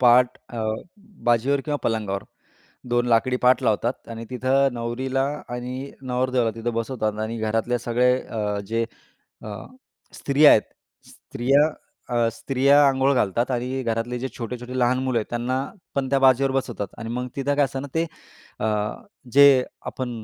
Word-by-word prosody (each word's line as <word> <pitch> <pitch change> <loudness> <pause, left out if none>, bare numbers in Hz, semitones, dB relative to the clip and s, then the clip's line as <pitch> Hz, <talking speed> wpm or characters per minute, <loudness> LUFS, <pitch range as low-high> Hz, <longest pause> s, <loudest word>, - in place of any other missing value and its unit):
पाट 125 0 +5
अ, 115 -2 -4 0.6
बाजीवर 120 +4 +2
किंवा 150 -1 -1
पलंगावर 105 -4 -1 0.7
2 120 0 +2
लाकडी 120 +2 +2
पाट 125 0 +4
लावतात 115 +3 0
आणि 115 0 -6
तिथे 130 +2 +2
नवरीला 130 +3 -2 0.3
आणि 125 +3 -5
नवरदेवाला 125 -2 0
तिथे 115 +1 -2
बसवतात 110 -2 -2
आणि 115 +1 -3
घरातले 115 +3 0
सगळे 120 +1 +2
अ, 105 -2 -3
जे 115 +2 0 0.6
अ, - - -7 0.7
स्त्रिया 145 +2 +5
आहेत. 110 - +6 0.5
स्त्रिया 135 +4 +1 0.5
अ, 120 -1 +3
स्त्रिया 140 +4 +4
अंघोळ 135 +1 +2
घालतात 120 +1 +1
आणि 130 +2 -2
घरातले 115 +1 -2
जे 130 - -3
छोटे-छोटे 125 +2 -5
लहान 125 +1 +3
मुलं 130 -3 +1
आहेत 110 - -3
त्यांनापण 130 - -3
त्या 140 - +3
बाजेवर 135 +1 +4
बसवतात 120 -6 -2
आणि 115 - -6
मग 125 +1 -3
तिथे 140 +1 0
काय 145 - +4
असते 135 0 -4
ना 140 - -6
ते 165 +1 +1 0.5
अ, 110 - 0 0.7
जे 140 -2 +7 0.2
आपण 130 -1 -4
125 Hz, 150 wpm, -24 LUFS, 115-135 Hz, 0.7 s, जे